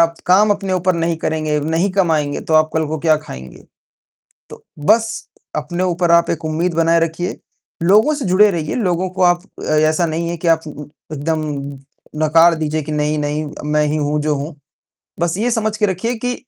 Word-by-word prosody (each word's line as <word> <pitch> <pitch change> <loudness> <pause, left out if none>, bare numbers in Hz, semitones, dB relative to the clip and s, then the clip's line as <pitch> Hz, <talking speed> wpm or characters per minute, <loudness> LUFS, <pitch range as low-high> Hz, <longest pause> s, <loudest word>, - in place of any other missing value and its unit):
आप 165 0 +3
काम 200 +4 +5
अपने 195 -2 -1
ऊपर 185 0 +1
नहीं 165 0 -1
करेंगे, 155 -1 -1
नहीं 165 +6 0
कमाएँगे 160 -7 +1
तो 160 - -2
आप 155 0 +4
कल 160 -1 +1
को 160 +1 -3
क्या 155 0 +3
खाएँगे? 65 - -10 0.9
तो - - -12 0.2
बस 225 +3 +1 0.3
अपने 175 +5 -2
ऊपर 175 -1 +1
आप 170 0 +4
एक 165 0 -2
उम्मीद 165 +3 -1
बनाए 165 0 +3
रखिए। 165 +2 -2 0.5
लोगों 210 - +4
से 285 - -4
जुड़े 195 +3 +5
रहिए, 160 -4 -3
लोगों 185 -5 0
को 185 +1 -5
आप 175 0 +3 0.2
अ, - - -7
ऐसा 155 +2 +2
नहीं 165 +1 -2
है 170 - -3
कि - - +1
आप 165 -1 +4
उ - - -6
उ 150 - -8 0.3
एकदम 155 +2 -2 0.8
नकार 165 +2 +5
दीजिए 155 0 -2
कि 155 - -6
नहीं, 150 0 0
नहीं 150 +1 -2 0.3
मैं 150 0 +2
ही 150 - -1
हूँ 150 0 0
जो 150 0 0
हूँ। 145 +2 -5 0.7
बस 170 -1 0
ये 240 +3 0
समझ 220 -2 -1
के 215 - +2
रखिए 195 +5 -2
कि, 245 +2 -2
165 Hz, 200 wpm, -18 LUFS, 155-185 Hz, 0.9 s, काम